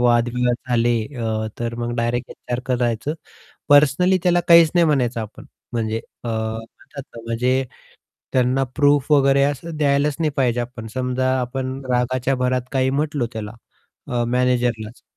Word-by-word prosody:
वादविवाद 120 0 +2
झाले 120 -1 +2 0.2
अ, 110 -2 -2
तर 120 0 -3
मग 120 0 -3
डायरेक्ट 120 +1 -1
एचआरकडे 125 +1 -3
जायचं. 120 +5 -1 0.5
पर्सनली 150 +6 +5
त्याला 175 -1 +3
काहीच 170 -2 +8
नाही 175 -1 +4
म्हणायचं 125 -6 +1
आपण 110 - -9 0.3
म्हणजे 110 -2 -1 0.3
अ, 120 - -3
म्हणतात 110 +5 -5
ना 115 - -7
म्हणजे 125 +3 +1 0.7
त्यांना 130 +1 +2
प्रूफ 145 -1 +3
वगैरे 140 -1 +4
असं 145 +4 -2
द्यायलाच 145 0 +2
नाही 160 -2 +1
पाहिजे 125 -3 +1
आपण. 120 -2 -7
समजा 130 0 0
आपण 130 +1 -3
रागाच्या 125 +2 +1
भरात 125 0 0
काही 130 -1 +1
म्हटलो 145 -1 -1
त्याला 105 -2 -5 0.6
अ, 120 -1 0
मॅनेजरलाच 120 -2 0
125 Hz, 140 wpm, -21 LUFS, 120-140 Hz, 0.7 s, काहीच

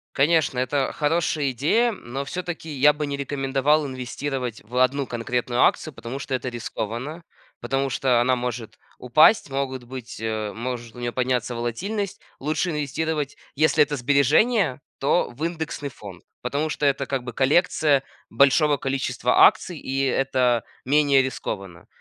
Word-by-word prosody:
Конечно, 145 -2 +2
это 135 +2 0
хорошая 150 -2 0
идея, 190 - +2
но 135 - -6
всё-таки 175 +2 -5
я 150 0 +4
бы 150 0 -3
не 140 0 -3
рекомендовал 140 +1 +1
инвестировать 130 -1 -4
в 115 +4 -11
1 130 +2 +2
конкретную 120 +1 -1
акцию, 155 - +2
потому 130 0 -7
что 135 -1 -3
это 130 0 -3
рискованно, 120 +6 -5 0.4
потому 135 0 -1
что 125 -2 +2
она 130 +1 +3
может 120 -2 -5 0.2
упасть, 155 - +5
могут 135 -2 -3
быть, 125 -1 -8
э, 110 -2 -2
может 120 -1 -5
у 120 - -10
нее 120 0 -2
подняться 125 -1 -1
волатильность. 190 - -3 0.2
Лучше 155 +5 -1
инвестировать, 150 -1 -2 0.2
если 155 +1 +3
это 145 - -3
сбережения, 145 - +3 0.2
то 140 +1 +1
в 140 +7 -8
индексный 160 -4 -4
фонд. 100 -8 -11 0.2
Потому 145 +5 -1
что 150 - -2
это 140 -1 +1
как 135 -3 -2
бы 120 - -7
коллекция 145 +1 +3 0.3
большого 145 +2 +4
количества 130 -2 +3
акций, 185 -7 -2
и 135 +1 -2
это 130 -3 +1 0.2
менее 140 0 +4
рискованно. 95 -8 -6
135 Hz, 145 wpm, -24 LUFS, 125-150 Hz, 0.4 s, упасть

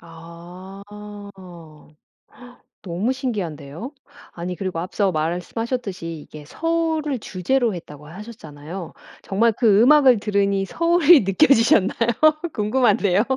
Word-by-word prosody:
아. 170 +3 -12 2.0
너무 190 +7 -2
신기한데요? 195 - -5 0.4
아니 180 +1 -6
그리고 185 -2 -4
앞서 190 +2 -1
말씀하셨듯이 180 +5 -3
이게 150 0 -12
서울을 320 - -2
주제로 225 +5 -1
했다고 150 -3 -11
하셨잖아요. 170 -3 -10 0.3
정말 225 +4 +1
그 215 -2 +3
음악을 260 -2 +5
들으니 200 -1 0
서울이 335 - +4
느껴지셨나요? 225 0 +3 0.4
궁금한데요. 210 -3 +2
200 Hz, 270 characters per minute, -21 LUFS, 175-245 Hz, 2.0 s, 음악을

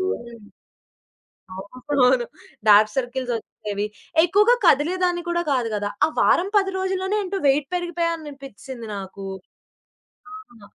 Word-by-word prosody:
హ్మ్. 235 - -4 1.2
అవునవును 250 +4 +1 0.4
dark 210 +1 +7
circles 255 0 -2
వచ్చేవి. 205 -1 -5 0.4
ఎక్కువగా 420 +7 +4
కదిలేదాన్ని 350 +4 +2
కూడా 345 0 0
కాదు 245 -3 0
గదా! 205 0 -2 0.2
ఆ - - 0
వారం 375 +3 +3
10 390 -1 +2
రోజుల్లోనే 380 +1 -1
ఏంటో 390 +1 -3
వెయిట్ 275 +1 +2
పెరిగిపోయానననిపిచ్చేసింది 295 - -5
నాకు. 195 0 -8 1.1
అవును. 240 - -14
275 Hz, 105 wpm, -23 LUFS, 235-360 Hz, 1.2 s, dark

